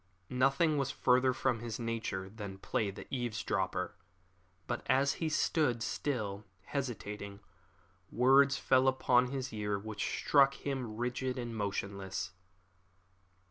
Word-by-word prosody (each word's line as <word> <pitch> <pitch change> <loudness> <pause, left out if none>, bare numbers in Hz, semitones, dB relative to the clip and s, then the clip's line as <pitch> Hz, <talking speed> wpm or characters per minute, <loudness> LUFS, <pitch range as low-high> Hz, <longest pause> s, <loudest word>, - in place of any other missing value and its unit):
Nothing 135 +4 +3
was 135 -1 0
further 130 -1 +3
from 130 -2 0
his 115 -1 -4
nature 115 -5 -3
than 100 -1 -7
play 100 +2 -1
the 100 - -8
eavesdropper; 120 -4 -1 0.7
but 120 - -2
as 135 +2 +4
he 160 - +1
stood, 145 -7 +1
still 105 -9 -2 0.2
hesitating, 105 -6 -4 0.7
words 135 +3 +5
fell 130 -1 +3
upon 125 -1 +4
his 130 -1 -4
ear 105 -1 -1
which 105 +1 -5
struck 140 -1 +4
him 130 -7 -4
rigid 125 +2 -2
and 120 -2 -4
motionless. 100 -4 -3
120 Hz, 120 wpm, -33 LUFS, 105-135 Hz, 0.7 s, words